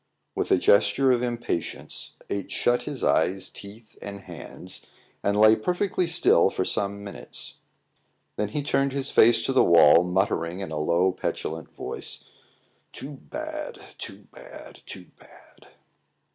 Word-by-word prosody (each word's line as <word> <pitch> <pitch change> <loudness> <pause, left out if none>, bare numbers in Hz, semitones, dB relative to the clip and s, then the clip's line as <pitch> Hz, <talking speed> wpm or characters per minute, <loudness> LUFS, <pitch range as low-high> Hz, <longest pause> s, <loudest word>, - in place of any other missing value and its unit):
With - - -2
a - - +5
gesture 105 +7 +4
of 120 -1 +2
impatience, 120 -9 -3
H 100 0 -4
shut 120 +4 +1
his - - -5
eyes, 95 +1 +1
teeth, 105 +2 -12
and 100 -1 -7
hands, 90 +1 -9 0.3
and 100 +1 +1
lay 110 +1 +7
perfectly 180 - -1
still 160 - +5
for 95 - -2
some 100 0 -2
minutes. 100 -1 -7 0.8
Then 105 - -1
he 145 +8 -3
turned 140 -1 +1
his 140 0 -2
face 115 0 +5
to 135 - -1
the 130 - +5
wall, 85 0 +7
muttering 90 -1 -1
in 95 -5 -5
a 75 - -3
low, 85 +4 +2
petulant 80 -3 -4
voice - - -7 0.7
"Too 140 - -8
bad! 310 - -7 0.2
too - - -9
bad! - - -12
too - - -10
bad!" - - -19
105 Hz, 145 wpm, -25 LUFS, 95-135 Hz, 0.8 s, lay